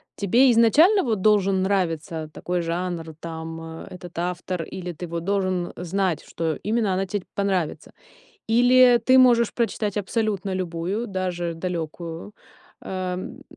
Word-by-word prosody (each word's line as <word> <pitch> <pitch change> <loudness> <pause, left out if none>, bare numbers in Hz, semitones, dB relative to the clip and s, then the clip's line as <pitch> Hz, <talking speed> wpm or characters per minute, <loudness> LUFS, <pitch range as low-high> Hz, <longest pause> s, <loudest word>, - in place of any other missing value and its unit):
тебе 240 +6 +4
изначально 300 - +5
вот 220 -6 -1
должен 195 -2 +3
нравиться 165 -4 -1
такой 180 0 -2
жанр, 170 -1 -3
там, 165 0 -6 0.3
этот 175 -2 -11
автор, 180 0 -3
или 180 +1 -6
ты 175 +3 -7
вот 170 0 -4
должен 185 -2 -1
знать, 180 -2 -1
что 160 -2 -2
именно 215 -2 +1
она 190 +1 0
те 200 0 -3
понравится? 190 -5 -2 0.6
Или 245 +1 +6
ты 260 0 +6
можешь 235 -3 +5
прочитать 215 -3 -1
абсолютно 205 -2 -1
любую, 185 +5 -3
даже 180 -3 -3
далёкую, 170 +2 -5 0.5
эм, 185 -1 -5
185 Hz, 130 wpm, -24 LUFS, 170-210 Hz, 0.6 s, Или